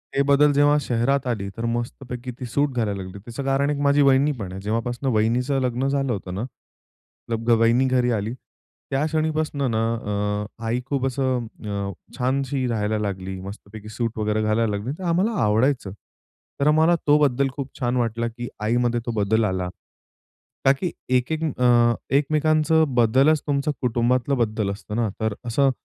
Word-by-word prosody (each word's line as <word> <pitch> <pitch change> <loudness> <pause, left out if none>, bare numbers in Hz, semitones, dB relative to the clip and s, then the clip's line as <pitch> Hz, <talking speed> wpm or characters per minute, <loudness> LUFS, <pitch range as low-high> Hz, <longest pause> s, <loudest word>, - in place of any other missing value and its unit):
ते 140 - +3
बदल 145 +1 +5
जेव्हा 145 +1 +4
शहरात 130 +2 0
आली, 105 -5 -2
तर 115 - -3
मस्तपैकी 120 +1 -4
ती 125 - -5
सूट 140 +5 +1
घालायला 105 -5 -1
लागली 95 +1 -8
त्याचं 120 +4 -6
कारण 135 +1 +1
एक 145 - -1
माझी 140 0 +4
वहिनी 140 +1 +4
पण 95 -4 -5
आहे, 95 +1 -7
जेव्हापासून 115 +5 -2
वहिनीचं 120 +6 +1
लग्न 125 +1 0
झालं 135 -1 0
होतं 95 -3 -5
ना, 100 - -3 0.9
मतलब 115 0 -2
वहिनी 120 +3 +4
घरी 125 -1 +2
आली, 110 0 -1 0.6
त्या 135 +2 +1
क्षणीपासनं 155 -4 -1
ना 110 0 +1
अ, 105 -2 -2 0.2
आई 120 +2 0
खूप 135 -1 -1
असं 130 -2 -1 0.2
अ, 100 -1 -3 0.3
छानशी 130 +1 0
राहायला 110 -2 -1
लागली, 95 -2 -4
मस्तपैकी 100 +2 -10
सूट 115 +1 -3
वगैरे 105 0 0
घालायला 110 +1 +1
लागली, 105 +5 -3
तर - - -7
आम्हाला 185 +7 +2
आवडायचं. 110 +1 +1 0.7
तर 140 - +3
आम्हाला 160 +3 +5
तो 145 +1 +6
बदल 140 -2 +2
खूप 140 -2 -5
छान 125 -1 0
वाटला 115 -1 0
की 120 +1 -6
आईमध्ये 120 +2 +1
तो 120 - -2
बदल 110 +1 +1
आला. 95 -2 -1 1.0
का 135 - +7
की 170 +6 -3 0.2
एक-एक 155 +6 0 0.2
अ, 120 -1 +5 0.2
एकमेकांचं 155 +2 +3
बदलच 130 +6 +4
तुमचं 145 +1 +1
कुटुंबातलं 125 +2 +1
बदल 110 -3 0
असतं 105 +1 -7
ना, 115 -2 +1
तर 110 -1 0
असं 135 +3 +2
120 Hz, 165 wpm, -23 LUFS, 110-140 Hz, 1.0 s, का